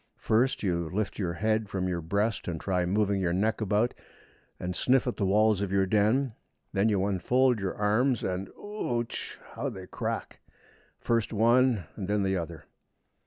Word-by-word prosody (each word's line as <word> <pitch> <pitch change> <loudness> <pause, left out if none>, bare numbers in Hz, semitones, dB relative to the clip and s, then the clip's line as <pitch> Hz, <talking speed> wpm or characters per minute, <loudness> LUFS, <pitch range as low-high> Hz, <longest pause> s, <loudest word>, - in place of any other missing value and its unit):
First 120 +4 +1
you 85 -4 0
lift 105 +3 -2
your 90 -4 -1
head 110 +2 0
from 95 -2 -1
your 90 -2 -2
breast 100 +7 -1
and 85 -3 -3
try 90 -1 0
moving 100 0 +1
your 85 -2 +1
neck 110 +5 0
about, 110 +3 +1 0.7
and 90 0 -3
sniff 130 0 +3
at 125 - -1
the 100 - +1
walls 105 +1 +3
of 100 -2 -2
your 95 0 +3
den. 110 +6 +2 0.4
Then 100 +3 +3
you 100 -2 +1
unfold 120 +6 +2
your 95 -1 -2
arms, 110 +4 +2
and 95 +1 -2
ooch! 120 - -4 0.2
how 130 +5 -2
they 95 -6 -8
crack, - - -4 0.6
first 115 -2 0
one 120 0 +3
and 95 -4 -5
then 105 0 +1
the 95 0 +1
other! 85 -2 -5
105 Hz, 170 wpm, -28 LUFS, 95-115 Hz, 0.7 s, sniff